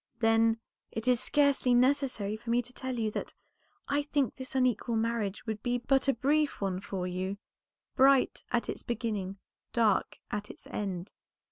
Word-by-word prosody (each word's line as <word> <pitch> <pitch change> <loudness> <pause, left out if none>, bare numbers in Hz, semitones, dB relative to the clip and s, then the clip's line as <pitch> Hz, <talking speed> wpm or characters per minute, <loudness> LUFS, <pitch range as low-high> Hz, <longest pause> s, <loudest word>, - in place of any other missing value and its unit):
"Then, 225 0 +4 0.3
it 225 +2 -4
is 250 -2 +4
scarcely 280 -2 +3
necessary 250 -5 +2
for 230 +2 -9
me 240 +1 +3
to 250 +2 -12
tell 260 -1 -4
you 220 -2 0
that - - -5 0.5
I 285 +1 +2
think 285 -4 0
this 260 0 -7
unequal 250 -2 +1
marriage 225 -3 -1
would 220 -2 -3
be 245 0 0
but 270 +3 +2
a 275 - +5
brief 295 +5 +1
one 190 -2 -1
for 190 -2 -4
you; 185 +2 -3 0.6
bright 270 0 +4
at 240 -1 +1
its - - -4
beginning, 215 -5 -3 0.4
dark 220 -4 +2
at 210 0 -3
its - - -11
end. 190 -2 -4
235 Hz, 165 wpm, -30 LUFS, 210-260 Hz, 0.6 s, a